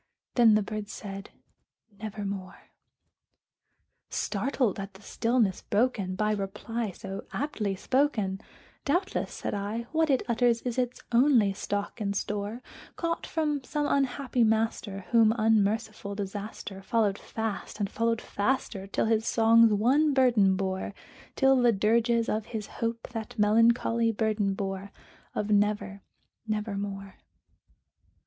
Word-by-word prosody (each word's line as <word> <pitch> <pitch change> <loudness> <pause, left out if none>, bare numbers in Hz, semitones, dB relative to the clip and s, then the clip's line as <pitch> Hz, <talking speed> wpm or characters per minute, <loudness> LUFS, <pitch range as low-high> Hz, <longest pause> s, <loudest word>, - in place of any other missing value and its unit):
Then 230 -3 +6
the 215 - +3
bird 210 0 -5
said, 195 -1 -7 0.7
"Nevermore." 200 -3 -6 1.4
Startled 220 0 -1
at 195 0 -7
the 195 - -15
stillness 230 -5 +1
broken 205 -4 0
by 210 +2 +1
reply 210 +3 -3
so 195 0 -7
aptly 215 -9 -2
spoken, 215 -5 0 0.4
"Doubtless," 360 +7 0
said - - -4
I, 210 +3 -3
"what 320 -1 +2
it 265 -2 +3
utters 235 -1 +2
is 250 0 -2
its 250 -1 -2
only 235 -5 +4
stock 205 +3 -4
and 200 -1 -1
store, 210 +4 -3 0.3
Caught 335 -1 -2
from 300 -4 -1
some 295 +3 -2
unhappy 270 -3 +1
master 220 -3 0
whom 225 -1 +5
unmerciful 215 -1 +1
Disaster 200 0 -6
Followed 205 0 +1
fast 220 -1 -5
and 205 - 0
followed 230 +2 0
faster 205 -3 -2
till 200 - 0
his 225 0 +1
songs 230 0 +5
one 270 +8 +3
burden 230 -8 +4
bore 190 +1 -3 0.4
Till 270 -2 +4
the 240 -1 +5
dirges 230 +3 +2
of 215 0 -1
his 220 -3 -4
Hope 230 +2 -4
that 225 -3 -6
melancholy 230 +2 +3
burden 210 -2 0
bore 195 0 -4 0.4
Of 210 0 -1
'Never 205 -1 +1 0.5
nevermore.'" 200 -2 -4
220 Hz, 125 wpm, -28 LUFS, 200-235 Hz, 1.4 s, Then